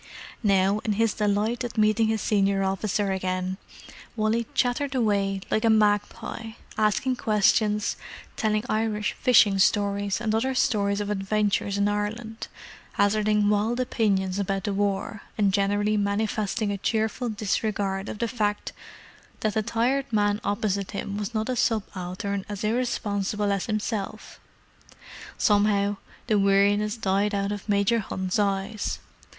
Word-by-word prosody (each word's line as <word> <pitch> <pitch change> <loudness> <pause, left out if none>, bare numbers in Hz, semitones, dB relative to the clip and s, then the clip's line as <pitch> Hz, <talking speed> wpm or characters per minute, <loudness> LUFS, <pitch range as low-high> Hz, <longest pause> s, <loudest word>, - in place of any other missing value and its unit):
Now, 195 -1 +3
in 215 -1 -1
his 225 +1 +1
delight 210 +4 0
at 240 -2 -6
meeting 215 +1 +3
his 220 -1 0
senior 195 -2 +2
officer 195 +1 0
again, 185 0 -2 0.6
Wally 220 +1 0
chattered 270 +3 0
away 200 -5 +1
like 215 - +1
a 230 - +4
magpie, 215 +1 0 0.2
asking 220 +5 +1
questions, 210 -1 +2 0.4
telling 215 -1 0
Irish 215 -1 0
fishing 210 -5 +4
stories, 200 0 +2
and 220 -2 -1
other 260 +4 0
stories 200 -4 +1
of 205 0 -3
adventures 200 0 0
in 200 0 +2
Ireland, 220 +2 -3 0.5
hazarding 210 0 +2
wild 210 +4 +1
opinions 200 -6 0
about 195 -1 -1
the 205 - -1
war, 200 +1 -1 0.2
and 200 -3 +2
generally 205 +1 +1
manifesting 205 +1 -1
a 200 - -3
cheerful 220 +4 -1
disregard 205 -2 -2
of - - -5
the 235 - -1
fact 210 -4 -2 0.7
that 215 -1 0
the 220 - +1
tired 240 +5 0
man 205 -1 +1
opposite 200 -1 -1
him 200 0 -4
was 210 +2 -4
not 215 0 0
a 255 - -1
subaltern 200 -3 -2
as 205 0 -5
irresponsible 210 -3 -1
as 195 -2 -1
himself. 215 -1 -4 1.0
Somehow, 205 -1 +2 0.3
the 215 -4 +2
weariness 200 +2 +3
died 205 0 +1
out 200 0 -1
of 205 +1 -6
Major 200 +3 +3
Hunt's 190 -1 -2
eyes. 200 +1 -1
210 Hz, 135 wpm, -25 LUFS, 200-220 Hz, 1.0 s, a